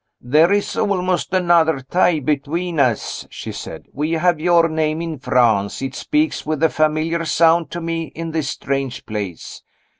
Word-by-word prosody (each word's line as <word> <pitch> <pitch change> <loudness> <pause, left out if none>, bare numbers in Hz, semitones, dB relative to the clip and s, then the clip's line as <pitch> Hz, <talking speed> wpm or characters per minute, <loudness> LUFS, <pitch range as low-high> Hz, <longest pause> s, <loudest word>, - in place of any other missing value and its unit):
"There 155 +8 +3
is 205 0 0
almost 185 -3 0
another 170 -5 +3
tie 175 +4 +2
between 155 +4 -2
us," 125 -5 0
she - - -7
said. - - -8
"We 150 +4 -2
have 170 0 +2
your 170 0 +4
name 155 -1 -1
in 165 -4 -5
France 120 -6 +2
it 135 - -3
speaks 305 +1 -1
with 155 0 -2
a 160 - +5
familiar 155 +2 0
sound 165 +1 +3
to 175 - -5
me 165 0 -2
in 165 0 -5
this 155 -4 -2
strange 135 -2 -3
place. 100 -6 -6
160 Hz, 160 wpm, -20 LUFS, 140-170 Hz, -, a